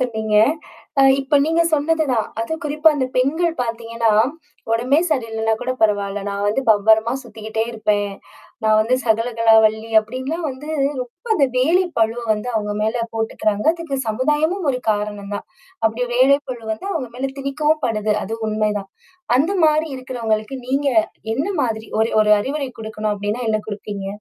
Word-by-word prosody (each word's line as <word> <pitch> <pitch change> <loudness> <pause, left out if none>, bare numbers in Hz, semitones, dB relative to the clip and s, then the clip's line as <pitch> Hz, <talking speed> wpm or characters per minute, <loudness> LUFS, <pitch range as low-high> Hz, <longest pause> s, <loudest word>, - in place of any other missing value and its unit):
சொன்னீங்க. 220 -4 -1 0.7
அ - - +7 0.2
இப்போ 275 +2 +2
நீங்க 330 +2 +2
சொன்னதுதான். 295 -6 +1
அதும் 320 +9 -3
குறிப்பா, 300 +2 +3
அந்த 260 - 0
பெண்கள் 320 +7 +1
பாத்தீங்கன்னா, 230 -1 -1 0.6
"உடம்பே 250 +6 +2
சரியில்லைன்னா 225 -5 0
கூட 255 - -1
பரவாயில்ல, 205 -1 +1
நான் 200 0 -3
வந்து 245 +6 0
பம்பரமா 220 +2 +4
சுத்திக்கிட்டே 220 -1 -4
இருப்பேன். 205 -2 0 0.5
நான் 215 0 +4
வந்து 225 +4 +2
சகலகலா 230 0 +3
வல்லி" 220 +1 -3
அப்படின்லாம் 260 +9 -4
வந்து 265 +3 -9 0.3
ரொம்ப 250 - -16
அந்த 280 - +3
வேலை 340 +9 +3
பளுவ 225 +1 +1
வந்து 215 +3 -3
அவுங்க 210 -1 -1
மேல 225 +2 0
போட்டுக்கிறாங்க. 215 0 -1
அதுக்கு 330 -5 -4
சமுதாயமும் 300 - 0
ஒரு 250 - -3
காரணம் 205 -1 -3
தான். - - -9 0.4
அப்படி 225 +3 +1
வேலைப்பளு 260 -2 +2
வந்து, 220 - -7
அவுங்க 260 -9 -3
மேலே 265 +1 -2
திணிக்கவும் 300 +3 0
படுது. 215 -2 0
அது 225 - -4
உண்மைதான்! 210 -2 -1 0.5
அந்த 325 +8 +2
மாரி 310 +1 +3
இருக்கிறவங்களுக்கு, 240 -2 -3
நீங்க 275 +2 +1 0.5
என்ன 280 +7 -1 0.2
மாதிரி 220 -2 -2
ஒரு 225 - +2
ஒரு 210 0 +4
அறிவுரை 275 +3 -3
குடுக்கணும் 215 -1 -3
அப்படின்னா 205 +4 -3
என்னா 215 -1 +1
குடுப்பீங்க? 205 -1 -5
230 Hz, 150 wpm, -20 LUFS, 215-275 Hz, 0.7 s, அ